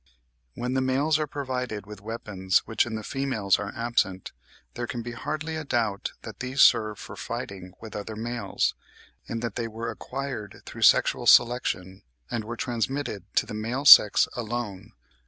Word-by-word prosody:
When 125 +1 -3
the 130 - +1
males 140 +4 +2
are 155 - -1
provided 125 -7 -4
with 105 -1 -10
weapons 105 -4 -1
which 115 - +1
in 110 - -4
the 110 - -5
females 130 -7 0
are 100 - -4
absent, 115 -6 -1 0.4
there 120 0 -4
can 120 0 -5
be 120 - -6
hardly 155 +6 -4
a 155 - -4
doubt 115 -8 -1
that - - -9
these 130 +2 -4
serve 110 -1 +4
for - - -9
fighting 95 -2 -6
with 110 -1 -10
other 105 +1 -5
males; 115 -2 -1 0.5
and 115 0 -4
that 115 -4 -3
they 115 -1 -2
were 115 +1 -5
acquired 130 -2 -6
through - - -9
sexual - - +4
selection, 95 -6 +3 0.3
and 115 -2 -2
were 115 +1 -6
transmitted 120 -4 -2
to - - +3
the - - -8
male 115 +6 -3
sex 105 -6 +9
alone. 110 -3 -5
115 Hz, 170 wpm, -26 LUFS, 105-125 Hz, 0.5 s, sex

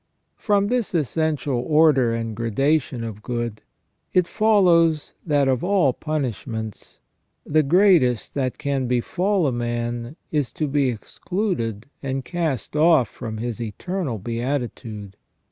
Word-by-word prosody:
From 205 -2 +2
this 245 -6 -1
essential 150 -3 0
order 145 -2 +4
and 115 -1 -3
gradation 125 +3 0
of 110 -2 -6
good, 120 -2 -3 0.5
it 180 -1 +4
follows 170 -8 +3
that 145 -3 +3
of 130 -2 +1
all 180 -8 +3
punishments 120 - -4 0.5
the 155 +1 +3
greatest 155 - +3
that 130 -3 -1
can 140 -3 -1
befall 180 - +1
a 135 - +2
man 120 +1 -3 0.2
is 145 -7 0
to 155 - -1
be 140 -1 +2
excluded 120 - -3 0.2
and 135 -1 -3
cast 160 - -2
off 155 -6 +4
from 110 -3 -6
his 120 +1 -4
eternal 135 - -3
beatitude. 115 -3 -4
135 Hz, 125 wpm, -23 LUFS, 120-160 Hz, 0.5 s, order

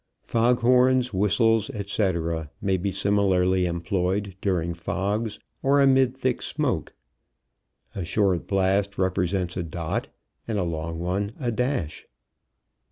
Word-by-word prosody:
Fog 120 +2 +2
horns, 125 0 +4
whistles, 105 +3 +2
etc., 85 -6 -1
may 95 -1 +1
be 95 +2 -1
similarly 95 -2 +2
employed 90 +3 -1
during 85 -4 0
fogs 100 +6 -2 0.2
or 140 +1 +3
amid 130 -2 +4
thick 130 -2 -1
smoke. - - -2 1.0
A 95 - -4
short 95 -1 +1
blast 100 +1 +1
represents 90 -1 0
a - - 0
dot, 80 0 -3 0.4
and 110 -2 -1
a 100 - +1
long 80 -1 -3
one 95 +5 -2
a 120 -4 -1
dash. 125 - -2
100 Hz, 120 wpm, -25 LUFS, 90-115 Hz, 1.0 s, horns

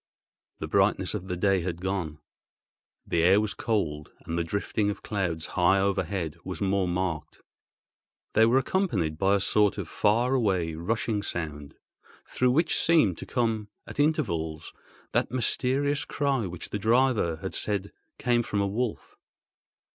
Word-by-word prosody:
The - - -5
brightness - - +2
of 95 - -5
the 90 -2 -3
day 95 0 +2
had 85 -1 -4
gone. 90 -5 -3 0.9
The 85 - +1
air 95 +4 +5
was 105 -2 -1
cold, 80 -10 -2
and 80 - -3
the 85 - 0
drifting 100 +4 -1
of 105 - -5
clouds 85 -7 -2
high 90 +2 +4
overhead 95 -4 -1
was - - -6
more 100 -1 +1
marked. 85 -3 -3 0.9
They 110 +1 +5
were 120 +3 +4
accompanied 115 - 0
by 95 +1 +3
a - - +2
sort 105 +1 +2
of 100 -5 -4
far 115 +9 +2
away 95 -10 +1
rushing 105 +5 -1
sound, 75 -7 -5 0.5
through 125 - +1
which 160 +4 +2
seemed 150 - +3
to - - -8
come 115 -4 0 0.2
at - - -9
intervals 85 - 0 0.4
that - - +1
mysterious 135 +4 +1
cry 135 -7 -1
which 90 -1 -7
the 105 - -3
driver 115 -6 +2
had 95 +4 -6
said 100 -2 -1 0.3
came 120 -1 +2
from 110 -3 -2
a 100 - +2
wolf. 110 +3 -3
100 Hz, 155 wpm, -27 LUFS, 85-120 Hz, 0.9 s, air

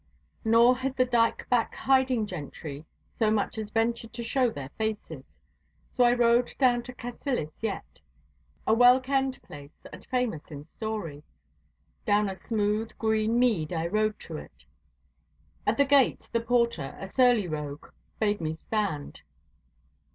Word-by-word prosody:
Nor 235 +3 +5
had 265 +1 -3
the 255 - +4
dyke 235 -2 +1
back 240 -2 +1
hiding 260 -4 +2
gentry 155 -4 -7 0.3
so 220 -2 +3
much 215 +1 0
as 215 -1 -5
ventured 225 +1 -1
to 235 0 -5
show 250 +2 +2
their 140 -11 -7
faces. 220 +4 -4 0.7
So 250 - +3
I 240 - +5
rode 240 0 +3
down 245 -3 +3
to 250 - -8
Cassillis 245 - -4
yett, 220 -3 -5 0.6
a 220 - +3
well 245 +2 +7
kenned 265 0 -1
place 145 0 -13
and - - -10
famous 250 - -2
in 145 -2 -9
story. 190 -6 -5 0.8
Down 205 0 +2
a - - -3
smooth, 210 +3 -1
green 220 +1 +1
mead 220 -11 +2
I 165 -1 -1
rode 215 +4 0
to 160 - -7
it. - - -12 1.0
At 215 +2 +2
the 280 - +5
gate 275 -1 +3
the 230 - +1
porter, 235 - 0
a - - -5
surly 245 -3 +3
rogue, 150 -2 -5 0.3
bade 210 -3 +1
me 160 0 -2
stand. 175 - -3
220 Hz, 150 wpm, -28 LUFS, 190-245 Hz, 1.0 s, well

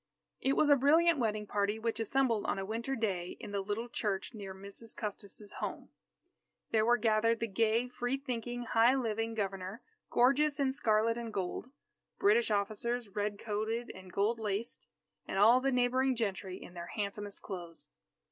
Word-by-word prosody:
It 270 - +2
was 295 +1 +4
a - - +9
brilliant 315 +4 +4
wedding 215 -3 0
party 205 +1 0
which 230 0 -2
assembled 230 -1 +1
on - - 0
a 195 - -3
winter 230 +6 -2
day 190 -7 -2
in - - -7
the 200 -1 -1
little 210 +4 -3
church 210 -2 -2
near 200 -3 -7
Mrs. 200 +4 -8
Custis's 205 -1 -6
home. - - -4 0.8
There 220 -1 +4
were 240 +2 +4
gathered 225 0 +2
the 230 - 0
gay, 225 +3 +1
free 245 +1 -2
thinking, 245 -2 -4
high 235 +2 +4
living 225 -3 -1
Governor, 195 +1 -3 0.3
gorgeous 275 +4 +3
in 270 -2 +2
scarlet 230 -2 +2
and 230 -1 -5
gold; 195 +4 -3 0.5
British 435 +4 +4
officers, 215 +3 -1
red 205 +1 -2
coated 220 +3 -2
and 185 -1 -12
gold 210 +5 +1
laced; 215 +1 -3 0.4
and - - -3
all 230 +6 +7
the 270 +1 +1
neighbouring 255 +1 +2
gentry 195 -4 -3
in - - -11
their 170 -1 -7
handsomest 205 -1 -4
clothes. 175 -4 -7
225 Hz, 165 wpm, -33 LUFS, 205-245 Hz, 0.8 s, a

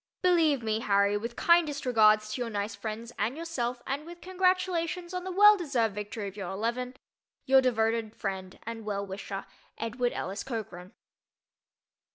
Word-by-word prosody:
Believe 320 -8 +3
me, 220 0 0
Harry, 200 -1 +2
with 235 +3 -4
kindest 320 -5 +3
regards 215 -3 +4
to 250 - -3
your 240 - -2
nice 205 0 -3
friends 225 +3 -6
and 230 +7 0
yourself 250 -8 -3
and 275 +2 -3
with 345 +2 -11
congratulations 365 -1 0
on 365 0 -3
the 375 - -3
well 415 +3 +8
deserved 255 - 0
victory 210 0 -5
of 195 - -8
your 195 -4 -5
"eleven," 235 +6 -2 0.5
Your 265 0 +6
devoted 225 -3 0
friend 190 -2 -5
and 230 0 -6
well 200 -1 -2
wisher, 195 0 -6 0.3
EDWARD 240 +2 -1
ELLIS 195 +2 -4
COCHRAN. 195 -7 -6
230 Hz, 160 wpm, -29 LUFS, 210-305 Hz, 0.5 s, well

